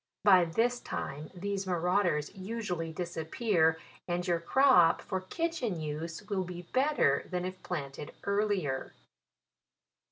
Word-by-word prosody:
By 190 -3 +7
this 235 +9 +1
time 150 - -5
these 200 +2 -3
maurauders 175 -3 +1
usually 190 -5 -4
disappear, 165 +1 +1 0.3
and 175 0 -1
your 170 -1 +2
crop, 175 -3 +5
for 190 -2 -3
kitchen 245 - -2
use, 160 +4 -4
will 200 -2 -1
be 180 -1 -7
better 255 - +2
than 180 -1 -2
if 185 0 -6
planted 145 -4 -5
earlier. 200 -9 0
180 Hz, 120 wpm, -31 LUFS, 165-205 Hz, 0.3 s, By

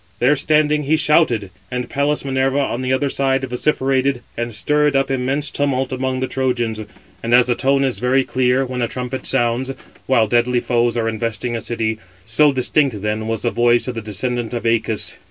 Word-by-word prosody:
There 130 +5 +3
standing, 150 0 +2
he 155 +3 +3
shouted, 150 - +2 0.2
and 125 0 -3
Pallas 145 +1 -1
Minerva, 135 0 0
on 135 -3 -1
the 130 0 -1
other 130 +2 +1
side, 135 -1 0
vociferated, 130 0 0
and 120 0 -3
stirred 150 +6 +1
up 135 0 +1
immense 135 +3 -1
tumult 135 -2 -1
among 130 0 -2
the 130 - 0
Trojans. 120 -5 -1 0.4
And 115 +1 +2
as 125 0 +6
the 125 - +1
tone 135 +2 +1
is 130 -2 -1
very 130 +2 +2
clear, 130 +1 +1
when 125 -1 -4
a 120 - +1
trumpet 125 +2 -5
sounds, 120 +3 0 0.3
while 125 -4 +4
deadly 120 +2 +2
foes 120 -1 0
are 115 -1 0
investing 115 +1 -2
a 115 - -3
city; 110 -1 -2 0.3
so 145 +7 +3
distinct 130 -4 +1
then 110 +1 -2
was 115 -1 -2
the 120 - +1
voice 120 +1 +2
of 125 - -2
the 115 - -5
descendant 120 +3 -2
of 120 - -3
Æacus. 115 -1 -1
125 Hz, 190 wpm, -19 LUFS, 120-135 Hz, 0.4 s, as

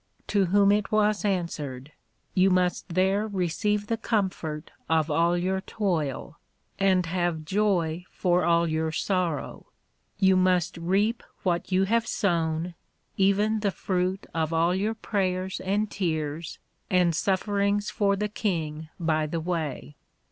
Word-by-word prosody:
To 200 -2 +3
whom 200 +2 +4
it 205 0 +1
was 215 -1 +2
answered, 155 -8 -3 0.4
You 190 +1 +4
must 180 0 +1
there 190 +4 +1
receive 205 +2 -1
the 230 +2 -1
comfort 185 -9 -2 0.2
of 160 -1 +2
all 170 +3 +3
your 190 +2 0
toil, 165 -8 -2 0.4
and 190 -2 +3
have 175 -2 -1
joy 180 -3 0
for 180 -1 +1
all 170 0 +3
your 160 0 -1
sorrow; 175 -2 -2 0.5
you 190 -1 +4
must 185 -2 +2
reap 195 +7 +1 0.2
what 175 0 -1
you 185 +1 +3
have 230 +4 +1
sown, 170 -2 0 0.4
even 205 +3 +2
the 205 -1 +1
fruit 185 0 -2
of 160 -1 -1
all 165 +2 +2
your 210 +4 -1
Prayers 190 -3 -1
and 205 +3 -1
Tears, 160 -3 -3 0.3
and 180 -2 +3
sufferings 200 +2 0
for 200 -1 +2
the 210 +2 -1
King 160 -8 -3
by 155 -2 +1
the 165 +2 -2
way. 160 -4 -4
185 Hz, 135 wpm, -26 LUFS, 165-200 Hz, 0.5 s, whom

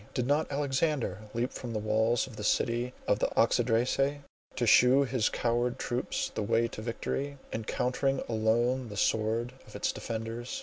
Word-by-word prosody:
Did 125 - 0
not 145 +4 +1
Alexander 140 - 0 0.2
leap 120 +2 -1
from 120 -2 -6
the - - -1
walls 110 +2 +1
of 125 - -11
the 105 - -6
city 120 +3 +1
of 105 - +2
the - - +2
Oxydracae, 125 +5 +2 0.3
to 120 - 0
shew 125 +4 +6
his 125 -5 +1
coward 120 +1 0
troops 125 0 -2
the - - -2
way 115 +2 +2
to 110 - -7
victory, 135 +5 -3 0.2
encountering 125 +4 0
alone 120 +3 +1
the 105 - -7
swords 115 +4 +1
of - - -13
its - - 0
defenders? 115 - -5
120 Hz, 165 wpm, -30 LUFS, 115-130 Hz, 0.3 s, shew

